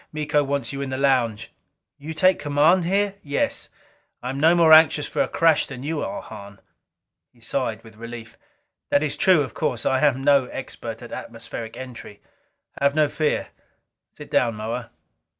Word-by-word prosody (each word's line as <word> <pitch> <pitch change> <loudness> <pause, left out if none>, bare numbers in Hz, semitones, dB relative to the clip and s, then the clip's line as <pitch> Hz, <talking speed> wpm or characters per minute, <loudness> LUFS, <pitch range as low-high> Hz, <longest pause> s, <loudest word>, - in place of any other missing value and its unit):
"Miko 150 -1 0
wants 140 0 -3
you 140 - -4
in 140 - -4
the 130 - -3
lounge." 125 -6 +1 0.5
"You 155 +3 -7
take 185 +3 +3
command 155 +5 +3
here?" 200 +2 0
"Yes. 145 -1 -2 0.5
I 125 - -3
am 135 - -5
no 165 +4 +5
more 165 -2 +6
anxious 155 -2 +6
for - - -1
a - - +1
crash 165 -2 +2
than 130 -2 -8
you 155 +1 -2
are, 200 0 -5
Hahn." 100 -2 -11 0.7
He - - -27
sighed - - -3
with 110 -2 -16
relief. 115 0 -9 0.5
"That 145 - +3
is 150 - -2
true, 185 -7 +4
of 130 - -8
course. 120 -2 -2
I 130 - +2
am 135 -3 +2
no 140 -2 +4
expert 115 -3 -7
at 120 - -10
atmospheric 115 -1 -7
entry." 125 -5 -9 0.6
"Have 140 +1 +2
no 155 -2 +3
fear. 155 0 -1 0.7
Sit - - -12
down, 115 -3 +2
Moa." 115 +2 -5
140 Hz, 175 wpm, -23 LUFS, 120-155 Hz, 0.7 s, more